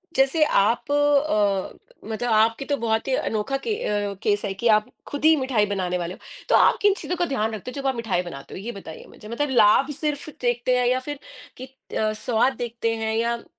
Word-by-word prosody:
जैसे 270 +4 +3
आप 230 +3 +1
अ, 280 -10 +1 0.3
मतलब 235 +2 -2
आपकी 225 +4 +3
तो 285 - 0
बहुत 225 -2 -1
ही 265 - 0
अनोखा 220 +5 -1
के 435 +9 -3
अ, 205 -1 -1
केस 205 -1 +1
है 195 - -2
कि 215 +5 -2
आप 210 - -5 0.2
खुद 285 +1 -4
ही 320 0 +7
मिठाई 260 -7 +1
बनाने 185 -3 -2
वाले 175 0 -4
हो, - - -13 0.3
तो - - +5
आप - - +5
किन 410 -1 +5
चीज़ों 360 - -3
का 350 - +1
ध्यान 225 -7 -1
रखते 215 +5 -7
हो - - -13
जब 275 - -2
आप 265 - 0
मिठाई 225 -6 -1
बनाते 140 -6 -9
हो? - - -6
ये 225 +5 -5
बताइए 195 -7 -10
मुझे, 210 - -13
मतलब 280 +6 -2
लाभ 235 +2 +4
सिर्फ़ 300 -1 -3
देखते 245 +1 +1
हैं 250 - +1
या 255 +1 +2
फिर 290 -1 -5 0.4
कित 260 +1 -12
अ, 215 0 +1
स्वाद 230 +4 +1
देखते 230 -1 -2
हैं 220 0 -2
या 235 +1 -1
235 Hz, 220 wpm, -24 LUFS, 210-270 Hz, 0.4 s, ही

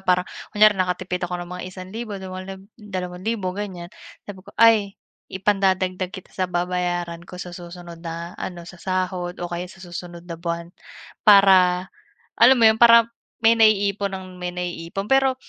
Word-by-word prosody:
parang, 180 0 +3 0.3
kunyari 215 0 +7
nakatipid 180 0 -2
ako 180 0 -3
ng 175 - -11
mga 180 0 -6
₱1,000, 200 +4 -7
dala 190 0 -7 0.2
₱2,000 185 0 -4
ganyan, 190 -2 -6 0.3
sabi 195 -2 -9
ko, 185 - -15
"Ay, 215 -3 +4 0.3
ipandadagdag 190 -1 0
kita 190 - -10
sa 185 - -1
babayaran 175 -1 -2
ko - - -11
sa 180 0 -7
susunod 175 -1 -10
na, 170 +1 -6
ano, 175 -2 -6
sa 180 +1 -12
sahod 185 -1 -2
o 175 - -4
kaya 175 +1 -4
sa 190 +1 -14
susunod 175 0 -8
na 170 -2 -7
buwan." 170 0 -4 0.5
Para 190 -3 +6 0.5
alam 265 - +8
mo 230 - +6
'yon, 220 - +2
para 230 -1 +8 0.4
may 230 +1 +6
naiipon 205 -2 +3
nang 185 -1 -8
may 180 0 -3
naiipon. 180 +2 -5
Pero, 270 -1 +4
185 Hz, 160 wpm, -22 LUFS, 175-200 Hz, 0.5 s, alam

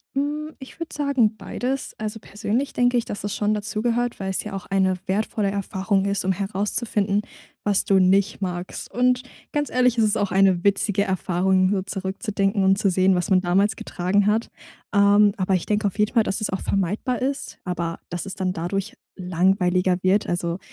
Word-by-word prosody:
Hm, 300 +2 -2
ich 265 +4 -12
würde 330 -1 -6
sagen, 265 -7 +2
beides. 250 +7 -3
Also, 215 +1 -4
persönlich 220 +6 -3
denke 245 0 +2
ich, 235 - 0
dass 205 - -6
es 205 - -2
schon 210 0 +1
dazugehört, 230 +3 -1
weil 190 -1 -3
es 190 - -1
ja 210 - -7
auch 195 - -6
eine 190 -1 +2
wertvolle 200 +1 -1
Erfahrung 195 0 -1
ist, 200 -1 -1
um 190 - +2
herauszufinden, 205 +1 0 0.4
was 205 -2 +2
du 195 -1 +4
nicht 195 +3 +2
magst. 180 -1 -5
Und, 250 +1 +2 0.3
ganz 295 -1 -1
ehrlich, 250 -1 +2
es 225 - +4
ist 210 - +1
auch 205 - -1
eine 190 -2 +3
witzige 200 0 +2
Erfahrung, 185 0 +1
so 200 -2 +1
zurückzudenken 195 +1 -1
und 190 0 +4
zu 200 - +2
sehen, 185 +1 +3
was 180 +1 -1
man 185 -2 +4
damals 195 +3 +2
getragen 190 +3 0
hat. 220 +2 +1 0.4
Ähm, 205 0 +5
aber 190 0 0
ich 180 - -2
denke 210 0 +1
auf 200 - -6
jeden 210 - +2
Fall, 230 -3 +4
dass 195 +2 -2
es 215 - 0
auch 190 - -3
vermeidbar 200 +7 -1
ist, 270 +2 -3
aber 170 -2 -3
dass 175 +2 -4
es 195 0 -6
dann 185 -2 -1
dadurch 185 +3 -3 0.3
langweiliger 180 0 +2
wird, 190 +3 +2
also 175 0 -2
200 Hz, 190 wpm, -23 LUFS, 190-215 Hz, 0.4 s, Ähm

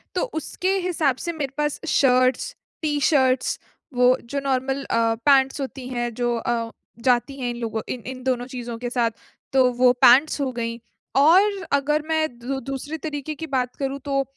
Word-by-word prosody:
तो - - +1 0.2
उसके 375 +6 -1
हिसाब 310 -7 +1
से 340 - -2
मेरे 280 -4 -4
पास 295 -1 -1
शर्ट्स, 255 -2 +2 0.3
टी-शर्ट्स, 285 -4 +2 0.3
वो 250 +1 +4
जो 280 +4 -3
नॉर्मल 270 0 -1
अ, 230 -3 +1
पैंट्स 270 0 +4
होती 265 -1 -6
हैं 240 -2 -2
जो 240 +1 0
अ, 230 0 -2 0.3
जाती 255 +2 +1
हैं 245 -2 -2
इन 240 - -4
लोगों 225 -2 -3
इन 250 - -4
इन 255 0 -7
दोनों 250 -1 0
चीज़ों 245 -2 -6
के 245 +1 -4
साथ, 240 -2 +1 0.4
तो 260 -2 +4
वो 250 +1 +5
पैंट्स 275 +6 +6
हो 270 -2 0
गईं। 230 -1 -3 0.4
और 380 +7 +5
अगर 290 +2 +2
मैं 315 -1 +1
दू 265 +3 -3
दूसरे 290 +4 -4
तरीके 300 -1 -5
की 320 +2 -6
बात 250 -1 -1
करूँ 275 0 -3
तो 275 -1 +1
265 Hz, 175 wpm, -23 LUFS, 245-285 Hz, 0.4 s, पैंट्स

